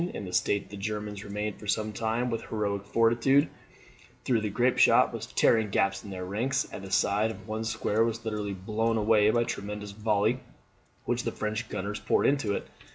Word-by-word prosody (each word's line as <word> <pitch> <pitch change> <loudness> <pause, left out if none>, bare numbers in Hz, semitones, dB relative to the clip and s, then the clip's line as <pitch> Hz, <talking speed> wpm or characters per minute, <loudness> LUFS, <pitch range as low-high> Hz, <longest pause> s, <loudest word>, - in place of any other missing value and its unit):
In 100 - -5
this 90 - +1
state 100 -1 -1
the 100 - -7
Germans 105 0 -4
remained 105 0 -4
for 105 - -10
some 110 +1 0
time 115 +3 -1
with 115 - -3
heroic 100 -2 -2
fortitude, 120 +7 +3 0.8
though 120 -3 +2
the 105 - -1
grape 120 +5 +1
shot - - +5
was - - -5
tearing 110 -2 +3
gaps 95 0 +1
in 105 - -9
their 90 -1 -5
ranks 120 +8 -1
and 95 - -7
the 95 - -7
side 100 +3 +2
of 110 - -9
one 110 +1 -3
square 110 -1 +1
was 115 0 -2
literally 105 -2 -3
blown 110 +4 -1
away 105 -1 +4
by 120 +2 +3
one - - +1
tremendous 105 -1 -5
volley 105 +3 +1 0.7
which - - 0
the - - -2
French 110 +3 -3
gunners 105 +1 -3
poured 110 - +1
into 125 -8 +2
it. - - -5
105 Hz, 200 wpm, -28 LUFS, 100-115 Hz, 0.8 s, shot